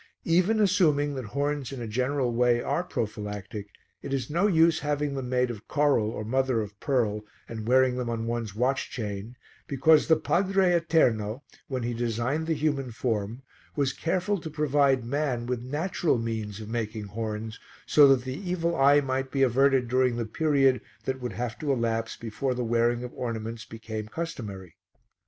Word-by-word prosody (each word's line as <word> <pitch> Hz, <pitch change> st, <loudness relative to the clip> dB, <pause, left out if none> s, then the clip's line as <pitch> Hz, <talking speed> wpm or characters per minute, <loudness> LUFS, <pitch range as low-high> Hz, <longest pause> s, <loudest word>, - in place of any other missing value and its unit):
Even 185 Hz, +6 st, +3 dB
assuming 160 Hz, -8 st, +3 dB
that 130 Hz, -3 st, -5 dB
horns 140 Hz, +4 st, -2 dB
in 135 Hz, -, -6 dB
a 120 Hz, -, -4 dB
general 125 Hz, +2 st, 0 dB
way 120 Hz, 0 st, +3 dB
are 170 Hz, -, -1 dB
prophylactic, 105 Hz, -, -5 dB, 0.3 s
it -, -, -7 dB
is 130 Hz, 0 st, -4 dB
no 175 Hz, +6 st, +3 dB
use 165 Hz, -3 st, +4 dB
having 145 Hz, -1 st, -1 dB
them 135 Hz, -2 st, -4 dB
made 125 Hz, -1 st, +1 dB
of 110 Hz, -3 st, -10 dB
coral 145 Hz, -7 st, +2 dB
or 110 Hz, -1 st, -5 dB
mother 130 Hz, +1 st, +1 dB
of 105 Hz, -1 st, -6 dB
pearl 110 Hz, -6 st, 0 dB, 0.2 s
and 110 Hz, -1 st, -6 dB
wearing 130 Hz, 0 st, +4 dB
them 125 Hz, -2 st, -2 dB
on 115 Hz, -1 st, -2 dB
one's 115 Hz, -3 st, -3 dB
watch 130 Hz, +4 st, 0 dB
chain, 105 Hz, 0 st, -5 dB, 0.3 s
because 150 Hz, +3 st, +4 dB
the 160 Hz, -, +6 dB
Padre 185 Hz, +3 st, +2 dB
Eterno, 130 Hz, -8 st, +2 dB, 0.2 s
when 130 Hz, -3 st, -3 dB
he 120 Hz, +1 st, -1 dB
designed 120 Hz, +7 st, -1 dB
the 165 Hz, -, +1 dB
human 145 Hz, -3 st, -1 dB
form, 115 Hz, +1 st, -3 dB, 0.3 s
was 140 Hz, -2 st, +1 dB
careful 185 Hz, +4 st, -1 dB
to 160 Hz, -, -6 dB
provide 145 Hz, -4 st, +2 dB
man 130 Hz, -2 st, -1 dB
with 125 Hz, -1 st, -2 dB
natural 155 Hz, +4 st, 0 dB
means 110 Hz, -3 st, -4 dB
of 110 Hz, -, -7 dB
making 110 Hz, -1 st, -3 dB
horns 110 Hz, +1 st, -5 dB, 0.3 s
so 145 Hz, -2 st, +7 dB
that 135 Hz, -2 st, +4 dB
the 130 Hz, -, -3 dB, 0.2 s
evil 170 Hz, -1 st, 0 dB
eye 140 Hz, 0 st, +5 dB
might 130 Hz, -1 st, -2 dB
be 135 Hz, 0 st, +1 dB
averted 135 Hz, 0 st, +3 dB
during 125 Hz, 0 st, +2 dB
the 120 Hz, -1 st, -2 dB
period 135 Hz, 0 st, +2 dB, 0.2 s
that 130 Hz, 0 st, -2 dB
would 125 Hz, -4 st, -4 dB
have 115 Hz, +2 st, -4 dB
to 150 Hz, -2 st, -1 dB
elapse 115 Hz, -3 st, -1 dB
before 120 Hz, +3 st, -3 dB
the 125 Hz, -, -2 dB
wearing 120 Hz, +1 st, +1 dB
of 125 Hz, -, -7 dB
ornaments 115 Hz, -2 st, -4 dB
became 110 Hz, -1 st, -6 dB
customary. 105 Hz, -, -6 dB
125 Hz, 175 wpm, -27 LUFS, 115-145 Hz, 0.3 s, so